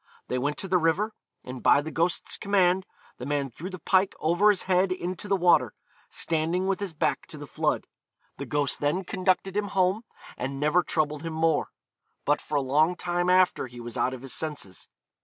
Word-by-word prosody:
They 125 - 0
went 145 +3 -1
to 195 - -4
the 185 -1 +3
river, 175 +7 +1 0.3
and 125 -1 -8
by 140 - +5
the 160 +2 -6
ghost's 170 +2 0
command 190 -2 +2 0.3
the 125 - -5
man 140 -2 -1
threw 170 +10 -7
the 185 - -7
pike 190 +3 +2
over 175 +7 +3
his 205 - +2
head 185 0 +2
into 185 +1 -3
the 200 - +2
water, 180 -2 +3 0.3
standing 165 +3 0
with 195 0 0
his 200 -3 -3
back 160 - -1
to - - -10
the - - -8
flood. - - -1 0.5
The - - -5
ghost 145 -2 0
then 150 +6 0
conducted 185 +1 0
him 210 0 0
home, 185 +3 +3 0.4
and 135 +2 -4
never 150 +5 +3
troubled 150 -3 -1
him 165 0 -5
more. 160 -1 +1 0.6
But 145 +1 +2
for 150 - -5
a 145 - +3
long 150 +6 +2
time 175 0 -1
after 185 -6 +3
he 120 0 -11
was 120 -1 -7
out 130 - 0
of 130 - -12
his 135 - -3
senses. 145 -12 -5
170 Hz, 200 wpm, -27 LUFS, 145-185 Hz, 0.6 s, by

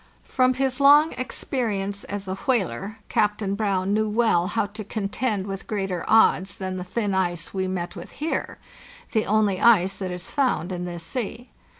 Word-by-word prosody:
From 255 -1 +2
his 265 0 -1
long 290 +3 +7
experience 210 -6 -3
as 200 -1 -5
a 190 - -2
whaler, 205 - -1
Captain 210 -2 0
Brown 200 -2 0
knew 215 0 +1
well 210 -6 +2
how 205 +1 0
to 210 +1 -8
contend 205 0 -2
with 195 -1 -6
greater 195 -5 -2
odds 200 -3 +4
than 185 -1 -4
the 180 - -4
thin 200 +2 -2
ice 175 -3 -1
we 190 -1 -1
met 180 -1 -3
with 175 - -9
here—the 280 -6 -4
only 205 -2 +2
ice 195 -5 +5
that 190 -2 -4
is 180 0 -6
found 255 - 0
in 180 -1 -3
this 175 -1 -5
sea. 240 +3 -4
200 Hz, 170 wpm, -24 LUFS, 185-230 Hz, -, long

